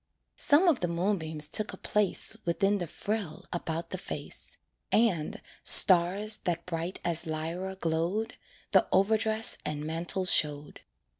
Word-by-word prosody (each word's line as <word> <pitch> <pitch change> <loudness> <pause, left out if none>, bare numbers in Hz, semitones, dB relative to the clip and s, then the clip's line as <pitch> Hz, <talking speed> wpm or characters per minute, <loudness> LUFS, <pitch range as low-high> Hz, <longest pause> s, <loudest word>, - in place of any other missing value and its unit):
Some 305 +6 +4
of 315 -7 +3
the 175 - -1
moonbeams 170 -4 -2
took 215 +7 -1
a - - -9
place 210 +1 0
Within 195 +4 0
the 175 - -4
frill 205 -3 -5
about 165 -1 -4
the - - -4
face; - - -5 0.3
And, 190 -9 +1 0.2
stars 195 +4 +6
that 170 -1 -2
bright 170 +1 -4
as 170 -1 +1
Lyra 165 +5 -4
glowed, 170 +5 -2 0.4
The - - +4
overdress 220 +3 +1
and 150 0 -4
mantle 170 +4 -2
showed. 150 -4 +1
175 Hz, 135 wpm, -29 LUFS, 165-210 Hz, 0.4 s, stars